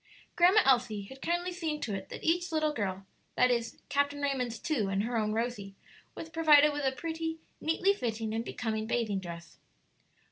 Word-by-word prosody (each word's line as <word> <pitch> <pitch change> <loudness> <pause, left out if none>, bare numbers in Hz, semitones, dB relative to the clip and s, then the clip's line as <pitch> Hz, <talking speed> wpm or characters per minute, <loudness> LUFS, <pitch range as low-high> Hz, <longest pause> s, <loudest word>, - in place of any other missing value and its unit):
Grandma 365 +5 +6
Elsie 240 -6 +3
had 265 +7 -12
kindly 345 +2 -1
seen 325 -4 -3
to 220 - -3
it 195 -1 -5
that - - -8
each 345 +2 +1
little 310 -1 +1
girl 195 -5 -3 0.3
that 250 0 +4
is, 235 -1 -2
Captain 285 0 0
Raymond's 260 -5 -1
two 240 - -1
and 195 +1 0
her 240 +2 -2
own 215 -2 +1
Rosie 220 -3 -3 0.4
was 325 - -7
provided 300 -2 +5
with 290 -1 -2
a 265 - +3
pretty, 325 +3 -4 0.2
neatly 360 +5 +2
fitting, 225 - -3
and 225 +1 -1
becoming 220 -2 -3
bathing 220 -4 0
dress. 170 -3 -9
250 Hz, 180 wpm, -30 LUFS, 220-320 Hz, 0.4 s, Grandma